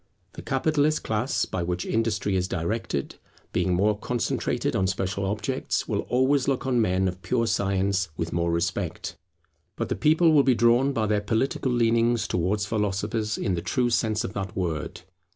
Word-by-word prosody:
The - - -8
Capitalist 150 +2 +1
class 110 +5 0
by 95 - -3
which 90 +1 -2
industry 110 -3 0
is 90 -1 0
directed, 90 -5 -3 0.4
being 90 0 +1
more 105 +4 +2
concentrated 120 +3 -1
on 95 - +2
special 95 +1 -2
objects, 105 +1 -2
will - - -1
always 130 +2 +2
look 135 -1 0
on 125 -3 +2
men 95 -2 +1
of 90 0 -4
pure 115 +6 0
science 100 -3 0
with 85 0 -3
more 85 0 0
respect. 85 +1 -2 0.6
But - - -3
the - - 0
people 160 +2 +4
will 150 -2 +6
be 130 -2 +3
drawn 120 +4 +4
by 115 -5 0
their 105 -1 +1
political 115 +4 0
leanings 115 -2 +2
towards 100 +4 0
philosophers 105 +1 -1
in 95 - -1
the 85 - -2
true 120 +5 0
sense 110 -2 +1
of 95 - -5
that 95 -3 -4
word. 85 -5 -3
105 Hz, 170 wpm, -26 LUFS, 95-120 Hz, 0.6 s, will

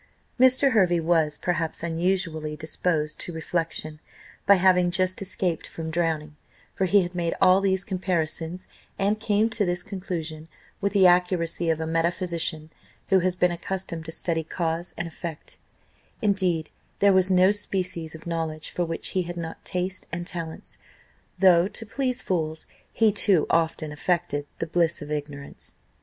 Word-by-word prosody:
Mr. 260 +2 +5
Hervey 180 -7 +3
was, 160 -2 +2
perhaps 170 -2 -1
unusually, 165 -2 -1
disposed 155 -1 0
to - - -2
reflection, 160 -1 -3 0.5
by 200 - +8
having 180 -1 +4
just 185 +2 0
escaped 185 -3 -2
from 160 -1 -6
drowning; 155 -2 -1 0.4
for 190 - 0
he 195 +1 +4
had 175 +1 -5
made 170 -2 -1
all 185 +1 +5
these 190 -1 +1
comparisons, 180 -2 -2 0.3
and 205 +2 +1
came 215 0 +2
to 215 -1 +1
this 175 -2 0
conclusion, 170 -5 -5 0.3
with 200 0 0
the 195 -2 +5
accuracy 175 -2 +2
of 160 -1 +1
a 160 - -2
metaphysician, 165 -1 -1 0.4
who 190 -1 +5
has 180 0 +1
been 180 -1 +2
accustomed 175 -1 -4
to 160 - -6
study 165 0 0
cause 165 +1 -3
and 175 - -3
effect 165 -1 -8 0.6
indeed 185 -6 +1 0.3
there 200 -1 +5
was 185 0 +3
no 185 +1 +5
species 185 -5 -2
of 160 - -11
knowledge 160 -2 -3
for 175 - -1
which 165 0 -4
he 185 - 0
had 175 0 -6
not 165 -1 -6
taste 185 +1 -3
and 175 +1 -4
talents, 170 -3 -6 0.6
though, 180 -1 +5
to 225 +2 -2
please 255 +2 -2
fools, 160 -3 -2 0.3
he 220 -2 +3
too 195 -5 +3
often 160 -2 0
affected 150 -2 -1
"the - - -2
bliss 170 0 +1
of 150 - -9
ignorance." 145 -1 -6
175 Hz, 155 wpm, -25 LUFS, 160-190 Hz, 0.6 s, by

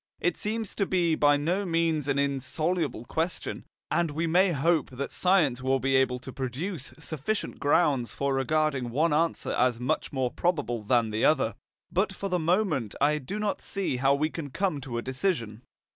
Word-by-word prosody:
It 175 -1 +1
seems 220 -1 -3
to 200 - -1
be 175 -3 +2
by 145 -2 +4
no 175 +7 0
means 165 -4 0
an 140 -1 +1
insoluble 140 0 -1
question, 165 +7 -3 0.3
and 170 -1 +2
we 155 +3 -2
may 180 +3 +4
hope 160 +1 +1
that 135 +2 -5
science 165 -10 +2
will 130 +1 +1
be 135 0 +1
able 130 -1 +3
to 130 0 -9
produce 135 +5 -4
sufficient 160 +6 -3
grounds 140 -6 +2
for 140 0 -1
regarding 135 -1 0
one 150 +6 +2
answer 165 +2 0
as 125 -2 +2
much 125 - -1
more 130 -3 -1
probable 145 -10 -1
than 115 +1 +2
the 110 +1 -1
other. 135 -7 +3 0.4
But 195 +2 +1
for 195 +1 -4
the 180 -1 +1
moment 170 - 0
I 150 +2 +3
do 150 +10 -5
not 210 -1 -1
see 195 -10 -1
how 135 +2 +3
we 155 +2 0
can 155 -4 -5
come 175 -1 -1
to 130 -3 -5
a 120 - -3
decision. 130 - -2
150 Hz, 185 wpm, -27 LUFS, 130-175 Hz, 0.4 s, by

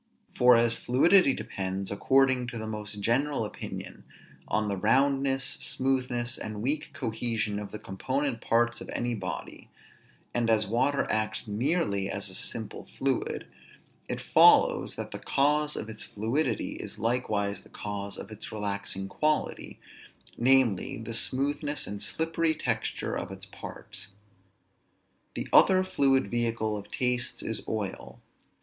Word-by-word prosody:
For 125 0 +7
as 115 0 +4
fluidity 135 +6 +4
depends, 95 0 -4
according 130 +3 +3
to 120 -1 -5
the 110 - -4
most 105 -1 -5
general 135 +3 +1
opinion, - - -7 0.4
on 110 0 0
the 100 - -1
roundness, 135 +5 +2
smoothness, 125 -2 -1
and 105 0 -5
weak 145 +4 0
cohesion 110 -3 -1
of 105 -1 -6
the - - -5
component 125 +6 -2
parts 120 +1 +1
of - - -8
any 120 0 -1
body, 95 -9 -6 0.6
and 120 -1 +1
as 110 -1 +3
water 130 +7 +1
acts 110 +1 -1
merely 105 - 0
as 100 -1 -2
a - - -7
simple 110 +2 -3
fluid, 135 -1 -1 0.6
it - - -2
follows - - +5
that - - -6
the - - -6
cause 150 +2 +2
of 110 - -4
its 110 -1 -9
fluidity 115 +3 -1
is - - -7
likewise 105 -4 0
the - - -19
cause 100 -1 -5
of 105 - -8
its 110 - -7
relaxing 100 -2 -3
quality, 150 +8 -1 0.6
namely, 125 -5 +3
the 115 +1 -6
smoothness 145 +5 0
and 100 0 -5
slippery 165 0 +1
texture - - -2
of - - -4
its 95 0 -8
parts. 100 0 -9 1.3
The - - -3
other 185 -1 +7
fluid 135 - +2
vehicle 115 -2 0
of 105 -1 -7
tastes 125 -1 -1
is 110 - -1
oil. 95 - -4
115 Hz, 140 wpm, -28 LUFS, 105-135 Hz, 1.3 s, For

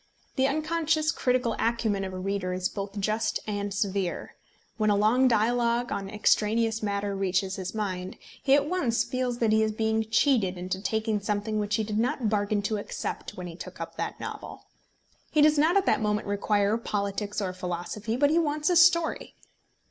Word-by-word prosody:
The 265 -1 +3
unconscious 310 +1 +1
critical 250 -2 0
acumen 225 -4 0
of 190 - -4
a 185 - -6
reader 185 -1 -2
is 185 0 -1
both 200 0 -5
just 215 +3 0
and 205 -1 -3
severe. 195 -2 -2 0.4
When 215 -2 +2
a 205 - +4
long 225 +6 +4
dialogue 235 +1 +1
on 195 -1 -3
extraneous 220 +2 +1
matter 200 -1 -2
reaches 195 0 0
his 190 +2 -5
mind, 185 -3 -3 0.2
he 270 -1 +4
at 285 0 +2
once 275 -10 +1
feels 255 -1 -2
that 230 -2 +1
he 220 0 +4
is 220 0 +1
being 220 0 -1
cheated 220 -7 +2
into 185 +1 -4
taking 220 0 0
something 210 +1 -2
which 210 0 0
he 220 - 0
did 210 0 -2
not 235 -1 0
bargain 205 -1 0
to 215 +1 -1
accept 205 - -5
when 180 - -5
he 170 -2 -7
took - - -9
up - - -6
that - - -4
novel. - - -7 0.6
He 305 - 0
does 305 -1 +5
not 325 +6 +4
at 395 - +2
that - - +2
moment 210 0 0
require 205 +1 +1
politics 205 -1 -2
or 190 -3 -2
philosophy, 185 +5 -4
but 285 +2 +3
he 330 - +4
wants 300 -1 0
his 345 -1 +6
story. 340 +7 +2
215 Hz, 185 wpm, -27 LUFS, 200-245 Hz, 0.6 s, his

